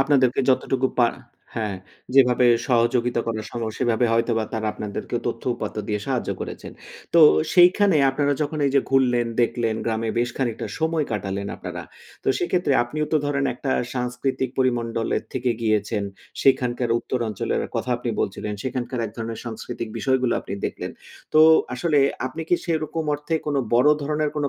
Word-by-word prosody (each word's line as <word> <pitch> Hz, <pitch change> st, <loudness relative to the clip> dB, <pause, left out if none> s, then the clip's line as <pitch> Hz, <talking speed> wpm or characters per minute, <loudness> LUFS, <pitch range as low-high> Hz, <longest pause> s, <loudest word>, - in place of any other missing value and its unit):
আপনাদেরকে 135 Hz, -3 st, +3 dB
যতটুকু 130 Hz, 0 st, +2 dB
পা 120 Hz, -, +5 dB, 0.5 s
হ্যাঁ, 105 Hz, -3 st, -2 dB, 0.4 s
যেভাবে 125 Hz, -2 st, +5 dB, 0.2 s
সহযোগিতা 120 Hz, 0 st, +2 dB
করা 110 Hz, -1 st, -2 dB
সম্ভব, 115 Hz, -2 st, -3 dB
সেভাবে 120 Hz, -1 st, +2 dB
হয়তোবা 115 Hz, -1 st, +1 dB
তারা 110 Hz, -1 st, -2 dB
আপনাদেরকেও 105 Hz, -1 st, -4 dB
তথ্য-উপাত্ত -, -, -3 dB
দিয়ে 105 Hz, -1 st, -1 dB
সাহায্য 130 Hz, -3 st, -1 dB
করেছেন। -, -, -7 dB, 0.4 s
তো 170 Hz, -, +7 dB, 0.3 s
সেইখানে 185 Hz, 0 st, +5 dB
আপনারা 145 Hz, +1 st, +1 dB
যখন 150 Hz, +1 st, -3 dB
এই 140 Hz, -, +1 dB
যে 140 Hz, -, +6 dB
ঘুরলেন, 125 Hz, -3 st, +3 dB, 0.2 s
দেখলেন, 115 Hz, -2 st, 0 dB
গ্রামে 115 Hz, 0 st, -1 dB
বেশ 120 Hz, 0 st, +1 dB
খানিকটা 120 Hz, -4 st, -2 dB
সময় 160 Hz, -1 st, +1 dB
কাটালেন 100 Hz, -1 st, -3 dB
আপনারা, -, -, -6 dB, 0.4 s
তো -, -, 0 dB
সেক্ষেত্রে 175 Hz, -3 st, +1 dB
আপনিও 150 Hz, +5 st, -3 dB
তো -, -, +5 dB
ধরেন 140 Hz, -1 st, 0 dB
একটা 135 Hz, -, -4 dB, 0.2 s
সাংস্কৃতিক 125 Hz, +1 st, -2 dB
পরিমণ্ডলের 115 Hz, -3 st, 0 dB
থেকে 125 Hz, -1 st, 0 dB
গিয়েছেন। 105 Hz, -1 st, 0 dB, 0.4 s
সেখানকার 125 Hz, -3 st, +2 dB
উত্তর 125 Hz, -, -3 dB
অঞ্চলের 105 Hz, -, -2 dB, 0.2 s
কথা 125 Hz, -, -2 dB
আপনি 120 Hz, -1 st, -3 dB
বলছিলেন। 105 Hz, +2 st, -3 dB
সেখানকার 130 Hz, -1 st, -3 dB
এক -, -, -8 dB
ধরনের 115 Hz, -1 st, -5 dB
সাংস্কৃতিক 115 Hz, 0 st, -5 dB
বিষয়গুলো 130 Hz, -2 st, +1 dB
আপনি 100 Hz, -, -6 dB
দেখলেন। -, -, -5 dB, 0.4 s
তো 155 Hz, -, +7 dB, 0.3 s
আসলে 150 Hz, +3 st, +1 dB, 0.3 s
আপনি 160 Hz, +6 st, -5 dB
কি 175 Hz, -, +4 dB
সেরকম 160 Hz, -1 st, -2 dB
অর্থে 150 Hz, +3 st, -3 dB
কোনো 145 Hz, -2 st, +1 dB, 0.2 s
বড় 125 Hz, +5 st, +5 dB
ধরনের 150 Hz, +1 st, 0 dB
কোনো 145 Hz, -1 st, 0 dB
125 Hz, 155 wpm, -23 LUFS, 115-140 Hz, 0.5 s, তো